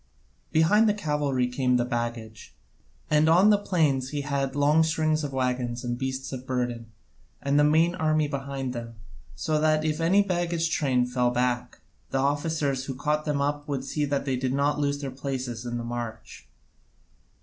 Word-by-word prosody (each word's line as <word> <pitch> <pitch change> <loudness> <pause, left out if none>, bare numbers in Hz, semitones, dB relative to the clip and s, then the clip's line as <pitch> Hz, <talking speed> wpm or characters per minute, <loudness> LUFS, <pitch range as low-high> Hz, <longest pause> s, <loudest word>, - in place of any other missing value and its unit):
Behind 210 +8 +4
the 210 - +1
cavalry 145 -8 0
came 125 0 +1
the 120 - +1
baggage, 120 -3 -5 0.5
and 155 +1 +3
on 185 +6 +6
the 205 - +5
plains 150 -10 +1
he 145 0 -3
had 140 -2 -2
long 145 +2 +4
strings 155 -1 +1
of 145 - -3
waggons 125 -2 -2
and 120 -1 -2
beasts 130 +1 -4
of 130 0 -7
burden, 120 -2 -2 0.5
and 140 +1 +1
the - - +5
main 160 +3 +4
army 155 -4 +1
behind 135 -2 -4
them, 115 -1 -7 0.4
so 155 - -1
that 155 0 +2
if 155 +1 -1
any 185 +5 +4
of - - -2
the 185 - +1
baggage 170 -2 -1
train 130 -4 +2
fell 125 0 +1
back, 125 0 -1 0.3
the - - -1
officers 145 -1 0
who 135 - -5
caught 150 +3 -1
them 145 -2 0
up 145 +1 -2
would 135 -2 -3
see 150 +2 -2
that 140 -1 -1
they 135 -2 0
did 130 0 -1
not 145 +1 +1
lose 145 0 0
their 135 -2 -4
places 130 -3 -4
in 120 0 -3
the 120 - -4
march. 120 -1 -6
140 Hz, 185 wpm, -26 LUFS, 125-155 Hz, 0.5 s, on